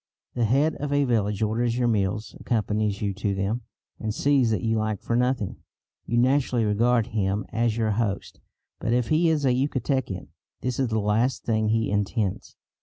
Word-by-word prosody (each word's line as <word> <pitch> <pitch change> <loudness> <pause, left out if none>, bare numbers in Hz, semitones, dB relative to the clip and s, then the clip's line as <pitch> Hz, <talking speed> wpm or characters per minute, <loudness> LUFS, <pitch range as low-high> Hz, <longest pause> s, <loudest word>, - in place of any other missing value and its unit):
The 120 -2 +1
head 140 +8 +3
of 145 0 -4
a 145 0 +3
village 110 -5 +1
orders 115 +2 0
your 125 -1 +2
meals, 105 0 -1
accompanies 105 -3 -1
you 100 -1 0
to 100 +1 -2
them, 100 +5 -1 0.4
and 110 - -2
sees 135 +1 +2
that 110 -5 0
you 115 -1 +1
lack 110 -2 -1
for 115 - -2
nothing. 125 -4 0 0.5
You 120 - 0
naturally 125 -2 +2
regard 115 +2 +2
him 100 -1 -1
as 115 0 0
your 110 -2 +1
host; 100 -2 -2 0.4
but 115 - 0
if 125 -2 +1
he 165 +2 +3
is 150 -3 +1
a 130 - +4
Yucatecan 130 -6 -1 0.3
this 125 0 -2
is 135 - +2
the 110 -1 -1
last 110 +5 +1
thing 110 -2 +1
he 110 0 +1
intends. 105 -1 -1
115 Hz, 180 wpm, -25 LUFS, 105-125 Hz, 0.5 s, a